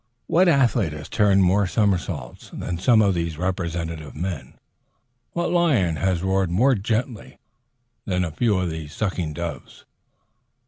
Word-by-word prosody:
What 180 Hz, +3 st, +3 dB
athlete 120 Hz, -, +3 dB
has 75 Hz, -1 st, -8 dB
turned 100 Hz, -2 st, +3 dB
more 95 Hz, +2 st, +3 dB
somersaults 90 Hz, -, -2 dB
than 85 Hz, -2 st, -4 dB
some 110 Hz, +3 st, +4 dB
of 100 Hz, -2 st, +3 dB
these 85 Hz, -3 st, -3 dB
representative 85 Hz, -4 st, -3 dB
men? 85 Hz, -2 st, -5 dB, 0.8 s
What 170 Hz, 0 st, -1 dB
lion 135 Hz, -, +2 dB
has 95 Hz, -1 st, 0 dB
roared 95 Hz, -1 st, +1 dB
more 120 Hz, +11 st, +3 dB
gently 110 Hz, +2 st, -3 dB, 0.7 s
than 90 Hz, -2 st, 0 dB
a 85 Hz, -, -4 dB
few 105 Hz, +5 st, +1 dB
of 90 Hz, -2 st, -1 dB
these 80 Hz, -2 st, -7 dB
sucking 90 Hz, -7 st, -2 dB
doves? 80 Hz, -4 st, -7 dB
95 Hz, 140 wpm, -23 LUFS, 85-110 Hz, 0.8 s, some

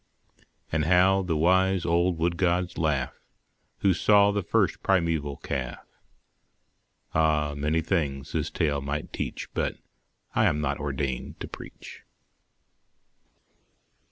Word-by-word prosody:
But 80 Hz, -1 st, +1 dB
how 95 Hz, +3 st, +4 dB
the 85 Hz, -4 st, -1 dB
wise 95 Hz, +2 st, +3 dB
old 85 Hz, +1 st, +2 dB
wood 85 Hz, +1 st, 0 dB
gods 90 Hz, 0 st, 0 dB
laugh, 75 Hz, -5 st, 0 dB, 0.7 s
Who 95 Hz, -2 st, +4 dB
saw 100 Hz, +2 st, +5 dB
the 100 Hz, 0 st, 0 dB
first 85 Hz, -, +1 dB
primeval 85 Hz, -7 st, +1 dB
calf! 65 Hz, -3 st, -5 dB, 1.3 s
Ah! 75 Hz, -2 st, +2 dB
many 75 Hz, +3 st, 0 dB
things 75 Hz, -6 st, -2 dB
this 80 Hz, 0 st, -1 dB
tale 75 Hz, -4 st, 0 dB
might 70 Hz, +2 st, -4 dB
teach -, -, -5 dB
But -, -, -1 dB, 0.6 s
I -, -, +3 dB
am 75 Hz, -, +2 dB
not 70 Hz, -2 st, -1 dB
ordained 70 Hz, -2 st, -3 dB
to -, -, -4 dB
preach. -, -, -11 dB
80 Hz, 120 wpm, -27 LUFS, 75-90 Hz, 1.3 s, saw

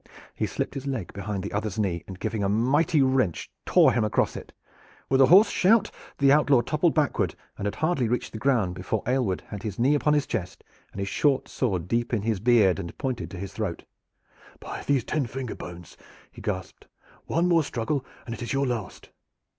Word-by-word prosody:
He -, -, -2 dB
slipped -, -, -3 dB
his 135 Hz, 0 st, -6 dB
leg 130 Hz, -10 st, -4 dB
behind 100 Hz, -1 st, -4 dB
the 100 Hz, -, -5 dB
other's 105 Hz, -1 st, -2 dB
knee, 95 Hz, -6 st, -1 dB
and, 95 Hz, -1 st, -9 dB
giving 110 Hz, -3 st, -2 dB
a 100 Hz, -, +1 dB
mighty 140 Hz, -, +3 dB
wrench, 130 Hz, -10 st, 0 dB, 0.2 s
tore -, -, +5 dB
him 120 Hz, -, +1 dB
across 105 Hz, -, +1 dB
it. -, -, -8 dB, 0.6 s
With 135 Hz, 0 st, +4 dB
a 130 Hz, -, +7 dB
hoarse 195 Hz, +8 st, +7 dB
shout 210 Hz, +3 st, +3 dB, 0.3 s
the 140 Hz, -1 st, +4 dB
outlaw 140 Hz, -3 st, +5 dB
toppled 155 Hz, +6 st, +1 dB
backward 150 Hz, -4 st, +1 dB, 0.2 s
and 100 Hz, -, -3 dB
had 100 Hz, -, -3 dB
hardly 155 Hz, -7 st, +1 dB
reached 120 Hz, +2 st, -2 dB
the 110 Hz, -, -7 dB
ground 110 Hz, -8 st, +1 dB
before 95 Hz, +3 st, -3 dB
Aylward 120 Hz, -, 0 dB
had 105 Hz, -2 st, -6 dB
his 105 Hz, -3 st, -5 dB
knee 130 Hz, +5 st, +3 dB
upon 150 Hz, +1 st, +2 dB
his 145 Hz, -1 st, +1 dB
chest 95 Hz, -4 st, -4 dB, 0.3 s
and -, -, -13 dB
his 100 Hz, -, -2 dB
short 140 Hz, +5 st, +1 dB
sword 95 Hz, -9 st, -2 dB
deep 120 Hz, +4 st, 0 dB
in 105 Hz, -, -2 dB
his 110 Hz, -3 st, 0 dB
beard 110 Hz, -4 st, +4 dB
and 85 Hz, -3 st, -7 dB
pointed 130 Hz, -3 st, -3 dB
to 95 Hz, -, -8 dB
his 95 Hz, +1 st, -6 dB
throat. 100 Hz, -7 st, -4 dB, 0.8 s
"By -, -, -7 dB
these 140 Hz, -4 st, +2 dB
ten 145 Hz, -1 st, -1 dB
finger 125 Hz, 0 st, -5 dB
bones!" 90 Hz, -1 st, -10 dB, 0.3 s
he -, -, -12 dB
gasped, 95 Hz, -4 st, -5 dB, 0.4 s
"one 170 Hz, +2 st, +1 dB
more 170 Hz, -2 st, +4 dB
struggle 130 Hz, +1 st, -2 dB, 0.2 s
and 115 Hz, -, -5 dB
it 120 Hz, -, -8 dB
is 120 Hz, -, -3 dB
your 140 Hz, 0 st, +1 dB
last!" 120 Hz, -6 st, -5 dB
120 Hz, 205 wpm, -26 LUFS, 100-140 Hz, 0.8 s, a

